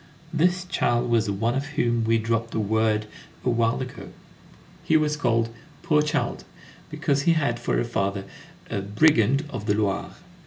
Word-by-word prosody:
This 175 +3 +2
child 120 -8 0
was 115 -2 +3
the 100 - 0
one 115 +4 0
of 135 +2 -2
whom 120 -3 +1
we 115 0 +3
dropped 115 +1 -1
a - - +1
word 110 0 +1 0.4
a 125 - +3
while 115 0 +1
ago. 130 0 -7 0.7
He 160 - +4
was 150 -1 +1
called 115 -5 +1 0.3
"poor 150 -1 +3
child," 150 0 -1 0.5
because 140 0 0
he 165 +4 +4
had 140 -7 0
for 120 - 0
a - - 0
father 100 -4 -1 0.5
"a 100 - -1
brigand 125 +5 +3
of 115 -5 -6
the 105 - +3
Loire." 100 -2 -1
120 Hz, 170 wpm, -25 LUFS, 110-145 Hz, 0.7 s, He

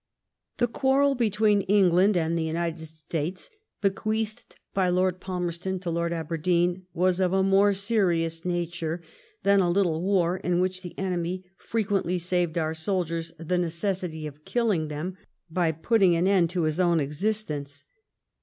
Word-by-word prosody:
The 240 - +3
quarrel 270 +3 +2
between 215 -4 +2
England 190 0 +4
and 165 0 0
the 165 - 0
United 160 0 -2
States 160 +3 -5 0.3
bequeathed 215 +3 -2 0.2
by 190 -2 +2
Lord 185 0 +1
Palmerston 180 0 -3
to 175 -3 -3
Lord 170 0 -1
Aberdeen 170 +2 0
was 180 +1 +1
of 185 -1 +2
a 190 0 +3
more 195 +1 +4
serious 175 -6 0
nature 175 -1 -2 0.4
than 200 0 +5
a 180 -2 +3
little 175 -3 +1
war 185 -2 +2
in 180 -1 0
which 185 0 0
the 175 -2 -9
enemy 185 -1 -2
frequently 200 -5 -1
saved 175 -1 0
our 160 -1 0
soldiers 165 -1 -2
the 175 +2 -1
necessity 170 -1 -2
of 150 0 -9
killing 205 -10 0
him 165 +5 -5 0.3
by 170 -1 +2
putting 185 +3 +3
an 170 +2 +1
end 185 -4 +3
to 175 -1 -1
his 155 +2 0
own 175 -2 +3
existence. 150 -1 -3
180 Hz, 150 wpm, -26 LUFS, 165-195 Hz, 0.4 s, than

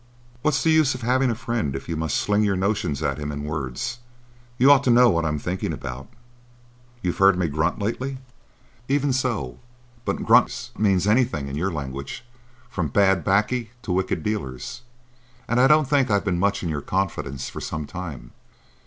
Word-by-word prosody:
"What's 150 -1 +1
the 160 - +4
use 155 -4 +4
of 125 - -8
having 130 +2 +2
a 115 - 0
friend, 115 - -2
if 65 - -6
you 85 - -2
must 80 -2 -1
sling 105 0 +1
your 100 -2 +2
notions 95 -7 -1
at 70 +2 -1
him 75 0 -4
in 75 0 -5
words? 75 - -4 0.6
You 130 +3 +6
ought 140 -1 +6
to - - +3
know 120 0 +6
what 85 -2 0
I'm 75 -1 0
thinking 90 +5 -3
about. 65 0 -6 1.0
You've 90 -1 -2
heard 95 -1 +6
me 90 -2 +1
grunt 80 +3 0
lately?" 130 +6 -3 0.7
"Even 140 0 +1
so; 115 - -2 0.4
but - - -2
grunts - - +3
mean 100 -3 +3
anything 105 - +2
in 70 - -5
your 90 +6 -1
language, 70 - -6 0.4
from 90 -9 -2
bad 95 +2 +3
"baccy 105 +5 +1
to - - -4
wicked 90 -3 0
dealers. 105 - -4 0.7
And 120 +2 +1
I 130 - +6
don't 150 0 +5
think 135 -3 +2
I've 100 -1 +1
been 90 -3 0
much 100 +1 +1
in 85 - -2
your 75 -2 -2
confidence 75 -7 -2
for - - -7
some 80 -1 -4
time." 75 -9 -7
95 Hz, 185 wpm, -24 LUFS, 75-120 Hz, 1.0 s, You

